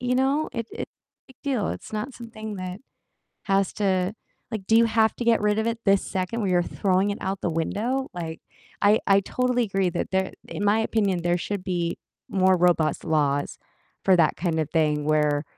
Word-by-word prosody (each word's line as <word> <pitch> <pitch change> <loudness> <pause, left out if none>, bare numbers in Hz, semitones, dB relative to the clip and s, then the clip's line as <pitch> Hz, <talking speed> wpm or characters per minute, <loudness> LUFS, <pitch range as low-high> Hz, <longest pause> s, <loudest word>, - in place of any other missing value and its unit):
You 250 0 0
know, 275 +4 +1
it 230 -1 -4
it - - -5 0.4
big 265 - -19
deal, 265 -8 0
it's - - -8
not 235 +5 -4
something 220 -2 -7
that 185 +1 -6 0.6
has 195 -1 +1
to 190 -1 0 0.4
like, 205 -4 -4
"Do 225 - +4
you 230 - +6
have 220 -1 +3
to 240 - -3
get 230 -2 +4
rid 210 +1 +2
of 220 - 0
it 230 0 -2
this 195 -1 +4
second 190 +5 -3
where 200 - 0
you're 175 -1 +3
throwing 190 +2 +1
it 200 - -4
out 195 0 -3
the - - 0
window?" 235 +11 -1
Like, 165 -2 -6 0.4
I 205 +2 +5
I 195 0 +6
totally 250 +4 0
agree 195 -2 0
that - - -3
there 190 0 0 0.2
in - - -4
my 210 +2 +4
opinion, 200 -5 +1
there 175 +1 +1
should 200 +1 -4
be 175 -2 -1 0.3
more 190 -1 +4
robust 170 -3 +2
laws 145 -3 0 0.5
for 190 -1 +5
that 160 -2 +3
kinda 160 -3 0
thing, 150 -2 +1
where 150 -1 +2
195 Hz, 195 wpm, -25 LUFS, 175-220 Hz, 0.6 s, you